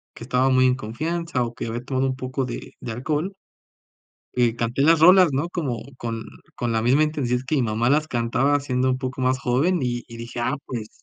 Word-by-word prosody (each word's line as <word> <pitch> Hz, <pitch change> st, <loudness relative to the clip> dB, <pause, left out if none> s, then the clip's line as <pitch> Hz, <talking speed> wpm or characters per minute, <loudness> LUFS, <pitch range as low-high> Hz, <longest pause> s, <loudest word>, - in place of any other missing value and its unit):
que -, -, -9 dB
estaba 125 Hz, +1 st, +2 dB
muy 130 Hz, 0 st, +4 dB
en 125 Hz, 0 st, +4 dB
confianza 150 Hz, +5 st, -2 dB
o 120 Hz, 0 st, -4 dB
que 120 Hz, -, -5 dB
había 120 Hz, +2 st, -4 dB
tomado 130 Hz, 0 st, 0 dB
un 130 Hz, -, -1 dB
poco 130 Hz, +1 st, -3 dB
de 120 Hz, -, -7 dB
de 120 Hz, -, -6 dB
alcohol, 155 Hz, -, -2 dB, 1.0 s
eh, 120 Hz, -2 st, +2 dB
canté 120 Hz, +3 st, -1 dB
las 165 Hz, +2 st, +5 dB
rolas, 180 Hz, +2 st, +7 dB
¿no?, 140 Hz, +5 st, 0 dB
como 140 Hz, -10 st, -2 dB, 0.2 s
con 115 Hz, -2 st, -4 dB, 0.3 s
con 120 Hz, -1 st, -1 dB
la 110 Hz, -, +1 dB
misma 130 Hz, +6 st, +4 dB
intensidad 140 Hz, -5 st, 0 dB
que 155 Hz, -, +1 dB
mi 140 Hz, -, +2 dB
mamá 115 Hz, +2 st, +1 dB
las 150 Hz, +3 st, +2 dB
cantaba 125 Hz, +4 st, +1 dB
siendo 130 Hz, -2 st, 0 dB
un 130 Hz, -, +1 dB
poco 130 Hz, -1 st, -4 dB
más 130 Hz, +1 st, +2 dB
joven, 140 Hz, +8 st, +1 dB
y 120 Hz, -1 st, -2 dB
y 115 Hz, -, -10 dB
dije: 115 Hz, +1 st, -6 dB
"Ah, 130 Hz, +3 st, 0 dB
pues", 115 Hz, -4 st, -5 dB
130 Hz, 220 wpm, -23 LUFS, 120-145 Hz, 1.0 s, rolas